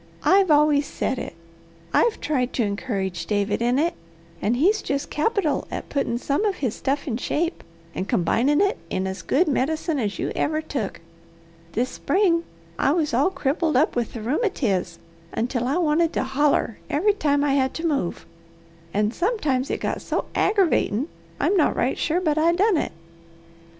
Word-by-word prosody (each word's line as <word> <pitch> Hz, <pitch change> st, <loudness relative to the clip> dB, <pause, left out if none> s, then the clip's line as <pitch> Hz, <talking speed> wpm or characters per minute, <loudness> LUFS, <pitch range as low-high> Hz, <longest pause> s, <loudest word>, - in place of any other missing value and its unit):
"I've 385 Hz, -1 st, +4 dB
always 295 Hz, -1 st, +4 dB
said 260 Hz, -, -2 dB
it! -, -, -6 dB, 0.6 s
I've 465 Hz, -2 st, +3 dB
tried 255 Hz, -4 st, -1 dB
to 240 Hz, -, +1 dB
encourage 195 Hz, -5 st, -3 dB
David 205 Hz, +1 st, 0 dB
in 245 Hz, +2 st, +2 dB
it. 330 Hz, +4 st, +1 dB, 0.5 s
And 230 Hz, +4 st, +1 dB
he's 400 Hz, -, +3 dB
just 280 Hz, +1 st, -3 dB
capital 315 Hz, -1 st, 0 dB
at -, -, -6 dB
puttin' 275 Hz, -4 st, -1 dB
some 280 Hz, -, -1 dB
of 410 Hz, -3 st, +1 dB
his 255 Hz, -10 st, -2 dB
stuff 280 Hz, +3 st, -2 dB
in 230 Hz, -4 st, -1 dB
shape, 330 Hz, +7 st, -2 dB, 0.3 s
and 190 Hz, -, -4 dB
combinin' 245 Hz, -, +2 dB
it 400 Hz, 0 st, +1 dB
in 185 Hz, -, -1 dB
as 190 Hz, 0 st, -4 dB
good 340 Hz, +7 st, +2 dB
medicine 310 Hz, +2 st, 0 dB
as 205 Hz, -6 st, -2 dB
you -, -, -2 dB
ever 310 Hz, +1 st, 0 dB
took. 270 Hz, -, -4 dB, 0.7 s
This 250 Hz, +3 st, 0 dB
spring 340 Hz, 0 st, +1 dB, 0.3 s
I 275 Hz, -, +3 dB
was 310 Hz, -5 st, 0 dB
all 275 Hz, +9 st, +3 dB
crippled 310 Hz, -3 st, 0 dB
up 300 Hz, -, +2 dB
with 240 Hz, -2 st, -1 dB
the 230 Hz, -, -6 dB
rheumatiz 230 Hz, -, 0 dB, 0.4 s
until 245 Hz, +1 st, -1 dB
I 280 Hz, +6 st, +1 dB
wanted 330 Hz, -1 st, +2 dB
to -, -, 0 dB
holler 270 Hz, -4 st, +1 dB
every 405 Hz, +8 st, +2 dB
time 290 Hz, -7 st, +1 dB
I 285 Hz, -2 st, +2 dB
had 265 Hz, -1 st, +1 dB
to 325 Hz, -, -3 dB
move, 280 Hz, -, -1 dB, 0.7 s
and 210 Hz, +2 st, +1 dB
sometimes 300 Hz, -, 0 dB
it -, -, -1 dB
got -, -, -2 dB
so -, -, -2 dB
aggravatin' 340 Hz, -, +2 dB, 0.3 s
I'm 405 Hz, -, +2 dB
not 335 Hz, -, +3 dB
right 250 Hz, -, +1 dB
sure 330 Hz, +2 st, 0 dB
but 310 Hz, -4 st, +1 dB
I 335 Hz, +2 st, +4 dB
done 390 Hz, +1 st, +3 dB
it. -, -, -1 dB
285 Hz, 175 wpm, -24 LUFS, 240-335 Hz, 0.7 s, I've